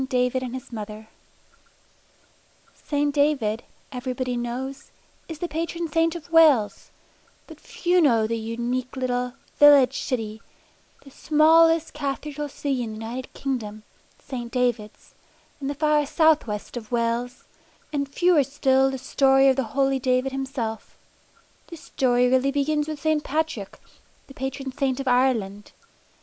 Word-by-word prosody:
DAVID 255 0 0
AND 255 0 -5
HIS 255 - -9
MOTHER 215 0 -7 1.7
St. 290 -1 -2
David, 275 -7 +1 0.3
everybody 250 0 -3
knows, 250 +3 -5 0.4
is 325 - -6
the 350 - -3
patron 335 +2 -3
saint 330 +2 +1
of 335 0 -9
Wales, 300 -10 +4 0.6
but - - -13
few 355 0 0
know 230 -8 +3
the 230 +1 -2
unique 240 +3 -3
little 250 -1 -2 0.3
"village 280 -3 +7
city," 220 -3 -4 0.6
the 275 - -15
smallest 325 +2 +4
cathedral 295 0 -4
city 275 -2 -2
in 225 -2 -4
the 220 +1 -7
United 250 +3 -6
Kingdom, 215 -6 -4 0.4
St. 240 -3 -6
Davids, 240 -4 -2 0.5
in 270 - -3
the 285 - -3
far 300 0 +2
south 315 -3 +3
west 210 +2 -6
of 225 -2 -7
Wales; 235 +1 -2 0.5
and 280 -1 -2
fewer 345 +1 +3
still 270 -1 +2
the 265 - -4
story 270 +1 +3
of 265 - +3
the 265 - 0 0.2
holy 270 -1 +2
David 255 +1 0
himself. 265 -5 -5 0.7
This 335 -3 -11
story 250 -1 +1
really 260 +2 +2
begins 295 +2 0
with 310 -2 -5
St. 310 0 0
Patrick, 305 -9 -3 0.5
the 275 - -14
patron 265 0 -5
saint 265 0 -1
of 275 - -5
Ireland. 235 -6 0
265 Hz, 140 wpm, -24 LUFS, 245-290 Hz, 1.7 s, village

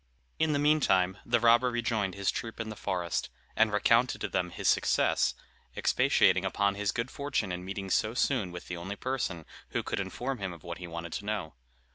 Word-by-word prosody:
In 160 -1 +3
the 145 - +2
meantime, 135 -11 +3
the 120 0 +2
robber 120 +2 +5
rejoined 110 -5 -1
his 100 -1 0
troop 115 -1 -6
in 115 -1 -3
the 110 - -6
forest, 90 -4 -2 0.3
and 110 -1 +4
recounted 115 +4 +3
to - - -2
them 90 -1 -1
his - - -4
success, - - +3 0.4
expatiating - - +3
upon 100 -1 +1
his 100 0 -1
good 120 +2 -3
fortune 140 -9 -2
in 90 0 -4
meeting 95 0 -5
so 110 +5 +1
soon 125 -8 +1
with 90 0 -8
the 85 - -4
only 95 +4 -5
person 120 -10 -3 0.2
who - - -2
could - - -2
inform 130 0 -3
him 95 -2 -3
of 85 - -13
what 85 -1 -6
he 90 - -7
wanted 85 0 -6
to 100 - -4
know. 105 -8 -3
105 Hz, 200 wpm, -30 LUFS, 90-120 Hz, 0.4 s, robber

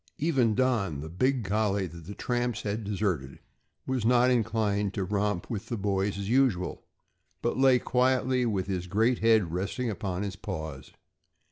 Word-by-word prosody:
Even 135 -8 +2
Don, 110 - +1
the 80 - -6
big 125 +7 0
collie, 100 0 +1
that 85 -1 -10
the 100 - -7
tramps 120 -2 -1
had 105 +2 -2
deserted, 95 -10 -2 0.5
was 130 -3 -1
not 125 +2 +4
inclined 105 -4 0
to 100 - -1
romp 100 -1 -1
with 110 -1 -5
the 120 - -3
boys 100 0 0
as 100 -1 -4
usual, 115 -7 +1 0.6
but - - 0
lay 130 -1 +5
quietly 130 0 +1
with 100 -6 0
his 90 -2 -3
great 110 +6 +2
head 110 -7 +3
resting 100 +6 -2
upon 95 -3 -3
his 100 -2 -4
paws. 80 -9 -6
105 Hz, 160 wpm, -28 LUFS, 95-120 Hz, 0.6 s, lay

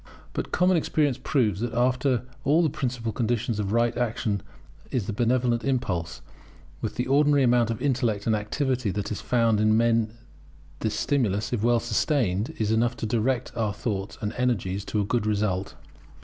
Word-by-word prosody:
But - - -4
common 180 0 +3
experience 150 -4 +1
proves 110 - +1
that 120 -1 -2
after 125 0 +2 0.2
all 155 +5 +4
the 155 - +1
principal 125 -6 -2
condition 115 0 -1
of 100 -1 -2
right 115 +1 +2
action 115 -3 -1 0.5
is 120 -6 -1
the 110 - -3
benevolent 120 +1 +1
impulse; 90 - -2 0.6
with - - -3
the 125 - -1
ordinary 145 +1 +4
amount 120 -2 +3
of 115 - -2
intellect 120 -7 0
and 110 - +2
activity 125 +2 -1
that 100 +2 -3
is 105 - -3
found 115 -3 +2
in 110 0 +4
men 115 -1 +2 0.6
this 110 -1 -1
stimulus, 110 -6 0
if 115 - 0
well 120 +1 +3
sustained, 120 - 0
is 110 -1 0
enough 120 +2 +1
to - - -3
direct 120 +3 -1
our 105 -3 -1
thoughts 100 -3 -3
and 105 0 -2
energies 100 -6 0
to 105 - -1
a 100 - +1
good 115 +1 0
result. 100 -3 -1
115 Hz, 175 wpm, -26 LUFS, 105-125 Hz, 0.6 s, all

